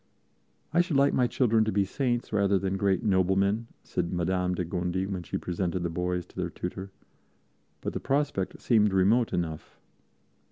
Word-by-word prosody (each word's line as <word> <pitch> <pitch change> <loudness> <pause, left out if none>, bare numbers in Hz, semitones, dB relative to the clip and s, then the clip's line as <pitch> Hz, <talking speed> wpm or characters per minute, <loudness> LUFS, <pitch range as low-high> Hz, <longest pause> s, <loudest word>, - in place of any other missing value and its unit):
"I 170 - +5
should 175 -5 0
like 140 +1 +4
my 125 - +3
children 115 -2 +2
to 110 - 0
be 100 0 +2
saints 120 +2 -2
rather 100 -1 +3
than 95 0 -1
great 95 +2 +1
noblemen," 100 +2 +2 0.2
said 85 - -2
Madame 90 +1 0
de 90 - -2
Gondi 90 +2 -2
when 95 -2 -4
she 85 - -4
presented 90 0 -2
the 85 - -2
boys 90 +1 -2
to - - -23
their - - -2
tutor, 95 +2 -6 0.9
but - - -3
the - - -2
prospect 140 -9 -1
seemed 105 -4 +3
remote 105 +6 +3
enough. 80 -3 -4
95 Hz, 170 wpm, -28 LUFS, 90-110 Hz, 0.9 s, I